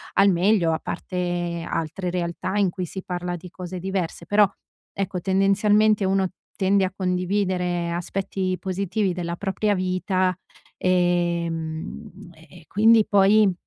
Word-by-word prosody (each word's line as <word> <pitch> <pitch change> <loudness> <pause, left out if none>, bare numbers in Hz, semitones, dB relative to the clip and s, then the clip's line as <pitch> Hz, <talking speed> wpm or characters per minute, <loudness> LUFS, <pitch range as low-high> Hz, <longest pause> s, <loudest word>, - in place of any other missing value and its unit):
al 195 +1 +6
meglio, 175 -2 +3
a - - -1
parte 175 -2 -3
altre 170 +3 -3
realtà 180 +2 -2
in 200 -2 +3
cui 180 +1 -4
si 190 +3 -7
parla 180 -1 -3
di 175 +1 -10
cose 180 0 -7
diverse. 190 -2 -3
Però, 205 0 +5 0.5
ecco, 190 -2 -3
tendenzialmente 200 +2 +3
uno 190 -1 +1 0.3
tende 195 0 +2
a 185 - -4
condividere 180 -2 0
aspetti 185 +1 -2
positivi 195 +1 -1
della 170 -1 -3
propria 200 +1 0
vita, 185 0 0 0.4
ehm, 170 -3 -1 0.2
e 160 +2 -16
e - - -22
quindi 220 +2 +5
poi 205 0 +5
185 Hz, 130 wpm, -24 LUFS, 175-195 Hz, 0.5 s, al